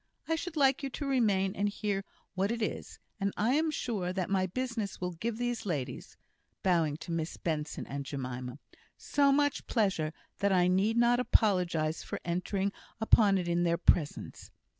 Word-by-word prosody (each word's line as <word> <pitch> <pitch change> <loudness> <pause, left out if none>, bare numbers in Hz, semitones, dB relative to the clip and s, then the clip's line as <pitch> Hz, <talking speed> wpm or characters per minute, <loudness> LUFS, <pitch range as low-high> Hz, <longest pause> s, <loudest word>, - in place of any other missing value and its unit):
I 325 - +2
should 325 0 -5
like 270 -1 +4
you 275 - -2
to 285 - -5
remain 205 -8 +2
and 205 +1 +1
hear 205 -1 -2 0.3
what 195 +3 0
it 235 - -2
is; - - -4 0.2
and 200 0 0
I 230 +5 +2
am 315 +2 +2
sure 215 -11 -2
that 185 0 -2
my 190 -1 +2
business 230 -1 -3
will 180 0 -2
give 220 +7 -3
these 240 -1 -2
ladies" 140 -9 -4 0.5
bowing 165 -5 +2
to - - -6
Miss 165 -1 -2
Benson 155 -2 -3
and 140 +1 -4
Jemima 125 -2 -5 0.4
"so 280 -1 +2
much 290 0 +1
pleasure, 195 -9 +1 0.3
that 200 0 +2
I 180 -2 +4
need 195 +5 +2
not 240 +1 +4
apologise 180 -10 +2
for - - -5
entering 190 +3 -1 0.3
upon 215 -2 +5
it 180 -2 -2
in 170 0 +1
their 170 -1 +2
presence." 160 -3 0
195 Hz, 175 wpm, -31 LUFS, 170-235 Hz, 0.5 s, upon